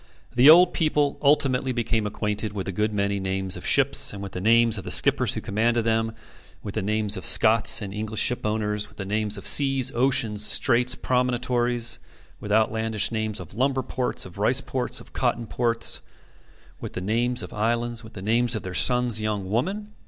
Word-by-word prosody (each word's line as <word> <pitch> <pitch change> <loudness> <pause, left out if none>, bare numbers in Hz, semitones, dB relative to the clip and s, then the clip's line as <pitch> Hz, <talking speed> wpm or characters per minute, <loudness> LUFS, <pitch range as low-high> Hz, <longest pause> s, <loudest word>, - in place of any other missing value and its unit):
The 125 +4 +6
old 175 +3 +7
people 150 -3 0
ultimately 135 -3 +2
became 115 -3 -1
acquainted 105 0 -3
with 100 -2 -5
a - - -2
good 105 +3 -1
many 100 -1 -1
names 95 -1 -3
of - - -7
ships, - - +2
and 100 - -8
with 100 - -7
the 90 - -6
names 115 +1 +3
of - - -9
the - - -7
skippers - - +3
who - - -4
commanded 115 +2 0
them 110 0 0 0.5
with 100 - -6
the 110 - -2
names 105 +1 -1
of - - -6
Scots 110 0 +3
and 100 -1 -7
English 110 +1 -4
shipowners 105 -3 0
with 105 - -22
the 100 - -5
names 105 +1 -2
of 100 - -9
seas, 135 -2 +3
oceans, 120 -4 +1
straits, 125 +3 +3
promontories 120 -1 0 0.4
with 105 - -7
outlandish 110 0 +1
names 110 -2 -3
of 90 -1 -11
lumber 130 +3 0
ports, 125 +1 -3
of 95 +1 -12
rice 125 +6 +3
ports, 130 -1 -3
of - - -16
cotton 120 - -1
ports 115 0 0 0.8
with - - -8
the - - -4
names 120 +5 0
of - - -9
islands 115 +2 -2
with 110 - -13
the 95 - -9
name 115 +4 +1
of 115 -3 -2
their 95 - -6
son's 125 0 +2
young 105 -3 -3
woman. 200 - -2
110 Hz, 190 wpm, -24 LUFS, 105-125 Hz, 0.8 s, old